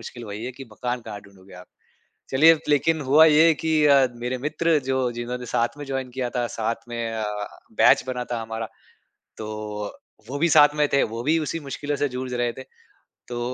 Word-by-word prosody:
मुश्किल 120 +1 -9
वही 105 +1 -6
है 125 - -5
कि 135 +2 -10
मकान 125 +3 -3
कहाँ 105 -2 -7
ढूँढोगे 95 -1 -17
आप? 90 - -15 0.6
चलिए, 160 +5 +6
लेकिन 155 +2 +2
हुआ 155 +3 +8
ये 160 +1 +6
कि 155 -1 +2
अ, 140 -2 +6 0.2
मेरे 125 +1 -1
मित्र 160 +1 +1
जो 130 0 +1
जिन्होंने 120 +1 -5
साथ 120 +4 0
में 145 - -7
जॉइन 135 -2 -4
किया 125 -1 -1
था, 120 - 0
साथ 115 +2 -3
में 115 -1 -3
अ, 110 -1 -3 0.6
बैच - - +6
बना 125 -1 -3
था 115 - -2
हमारा, 115 0 -5 0.7
तो 105 -1 -6 0.3
वो 140 - -3
भी 170 - +3
साथ 150 -1 +7
में 150 -1 +2
थे, 140 - +4
वो 115 +1 -5
भी 155 +5 +2
उसी 160 +1 -3
मुश्किलों 145 0 -4
से 145 - 0
जूझ 125 0 -4
रहे 120 -1 0
थे। 130 - -9 0.6
तो 120 -1 -5
125 Hz, 200 wpm, -24 LUFS, 115-145 Hz, 0.7 s, हुआ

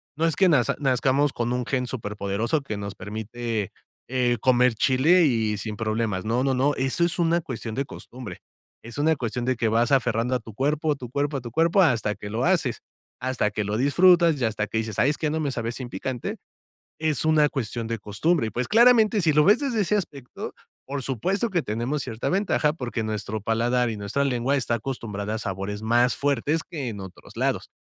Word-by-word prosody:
no 160 - 0
es 165 - +2
que 190 - +4
naz 130 -7 +3
nazcamos 135 +1 +2
con 120 +1 -1
un 125 -1 -1
gen 125 -2 -1
superpoderoso, 105 +3 -2
que 110 -7 -5
nos 100 0 -6
permite, 110 +1 -4 0.4
eh, 125 -2 +1
comer 125 -1 +4
chile, 145 +10 +4
y 110 -6 +1
sin 105 0 -5
problemas. 110 -3 -1
No, 120 +4 +1
no, 135 -1 +1
no. 140 +3 +2
Eso 135 +6 0
es 170 +1 0
una 170 0 +2
cuestión 115 -5 -6
de 135 +1 -1
costumbre. 120 -9 -9 0.4
Es 115 +2 -8
una 155 +2 +3
cuestión 120 -1 -3
de 130 0 +1
que 115 -1 0
vas 115 +3 +2
aferrando 120 -1 +2
a - - 0
tu 110 -2 -12
cuerpo, 150 +5 0
a - - +1
tu 125 -4 -9
cuerpo, 140 +2 -1
a - - -5
tu 120 -1 -8
cuerpo, 165 - +3
hasta 110 -8 +1
que 105 - -8
lo 115 +3 -1
haces, 160 -10 +1 0.4
hasta 125 -5 0
que 105 - -2
lo 105 +2 -2
disfrutas, 170 +2 +4
y - - +1
hasta 110 -1 -1
que 110 - -1
dices: 110 -3 -4
"Ay, 135 +6 +4
es 150 - -3
que 155 - 0
no 160 - -1
me 145 -3 -1
sabe 115 -2 -3
sin 125 0 -6
picante". 130 -1 -4 0.6
Es 155 -1 0
una 155 -2 +4
cuestión 120 -4 -4
de 115 -1 -2
costumbre 115 - 0
y, - - -4
pues, 120 +4 -3
claramente, 225 -2 +5
si 160 -3 +3
lo 150 - +5
ves 210 +5 +6
desde 260 -7 -1
ese 210 +2 +2
aspecto, 140 -10 -5 0.3
por 140 0 -4
supuesto 185 - -1
que 175 - +1
tenemos 120 +7 -2
cierta 115 -1 -3
ventaja, 185 -6 +1
porque 125 -6 -4
nuestro 110 0 -3
paladar 120 +3 +1
y 110 - -4
nuestra 105 +7 -2
lengua 135 0 +1
está 125 -3 0
acostumbrada 110 -4 -4
a - - -2
sabores 100 0 -4
más 120 +3 +3
fuertes, 145 +3 0
que 145 -6 -5
en 105 -3 -6
otros 95 -2 -11
lados. - - -1
125 Hz, 215 wpm, -25 LUFS, 110-150 Hz, 0.6 s, ves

